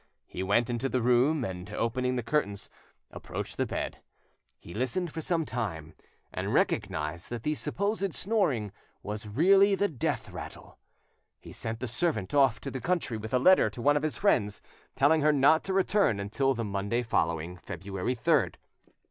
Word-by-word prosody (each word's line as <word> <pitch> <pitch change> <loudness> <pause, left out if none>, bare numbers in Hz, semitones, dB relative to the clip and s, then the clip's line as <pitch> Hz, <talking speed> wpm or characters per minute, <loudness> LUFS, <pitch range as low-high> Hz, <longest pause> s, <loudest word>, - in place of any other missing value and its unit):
He - - -6
went 100 +5 +2
into 125 +2 -2
the 130 - 0
room, 125 +4 +3
and, 90 0 -6
opening 125 +4 -1
the 125 - -2
curtains, 105 -8 -1 0.4
approached - - -6
the - - 0
bed. - - -4 0.6
He 85 - -12
listened 130 - -1
for 160 - -5
some 165 0 0
time, 95 - -4 0.4
and - - -3
recognised 75 +4 -1
that 120 -1 -5
the 150 - 0
supposed 195 +5 -2
snoring 150 - +1 0.3
was 105 +1 -5
really 195 - +5
he 200 +1 +1
death 135 - -2
rattle. - - -10 0.6
He - - -12
sent 110 0 -5
the 130 - -2
servant 120 - -1
off 135 -5 +4
into 135 - -6
the 130 - -5
country 165 -6 -1
with 110 +1 -7
a 130 - +3
letter 155 -3 +5
to 110 - -11
one 145 +4 +3
of 145 - +1
his 155 0 -2
friends, 105 - +2 0.4
telling 150 +4 +4
her 150 +1 +4
not 145 +3 +4
to 195 - -2
return 195 - +2
until 135 +7 0
the 115 -1 -2
Monday 100 +4 -1
following, 85 -5 -1
February 95 +7 -4
3rd. 115 - +2
125 Hz, 175 wpm, -29 LUFS, 105-155 Hz, 0.6 s, really